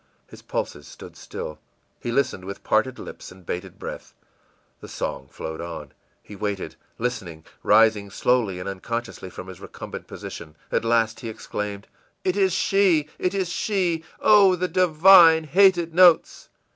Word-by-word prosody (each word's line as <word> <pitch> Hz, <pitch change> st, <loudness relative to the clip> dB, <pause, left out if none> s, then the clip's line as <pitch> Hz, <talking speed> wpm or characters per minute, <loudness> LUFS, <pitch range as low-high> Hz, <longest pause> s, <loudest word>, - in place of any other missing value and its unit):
His -, -, -15 dB
pulses 75 Hz, -, -5 dB
stood -, -, -12 dB
still; 75 Hz, -, -8 dB, 0.4 s
he 120 Hz, -, -4 dB
listened 120 Hz, -7 st, 0 dB
with 100 Hz, +1 st, -8 dB
parted -, -, +1 dB
lips -, -, -10 dB
and 90 Hz, -1 st, -16 dB
bated 90 Hz, +2 st, -6 dB
breath. -, -, -8 dB, 0.6 s
The -, -, -11 dB
song 65 Hz, -, -5 dB
flowed 80 Hz, +3 st, -7 dB
on 80 Hz, -5 st, -7 dB, 0.3 s
he 105 Hz, -, -11 dB
waiting, 100 Hz, -1 st, -4 dB, 0.2 s
listening, 95 Hz, -10 st, -4 dB, 0.2 s
rising 110 Hz, -2 st, +4 dB
slowly 105 Hz, -3 st, 0 dB
and 90 Hz, -, -6 dB
unconsciously 105 Hz, +1 st, -5 dB
from 90 Hz, -, -9 dB
his 95 Hz, -1 st, -11 dB
recumbent -, -, -9 dB
position. 75 Hz, -2 st, -9 dB, 0.2 s
At -, -, 0 dB
last 115 Hz, -1 st, +1 dB
he 115 Hz, -, -6 dB
exclaimed: 105 Hz, -2 st, -6 dB, 0.4 s
ìIt 185 Hz, 0 st, +1 dB
is! 190 Hz, -4 st, +2 dB
it 180 Hz, +2 st, -1 dB
is 190 Hz, -3 st, -1 dB
she! 175 Hz, -4 st, -1 dB, 0.2 s
Oh, 200 Hz, -3 st, +6 dB
the 180 Hz, +1 st, -1 dB
divine 170 Hz, -1 st, +6 dB
hated 175 Hz, 0 st, +3 dB
notes! 175 Hz, -1 st, +4 dB
120 Hz, 145 wpm, -23 LUFS, -, 0.6 s, Oh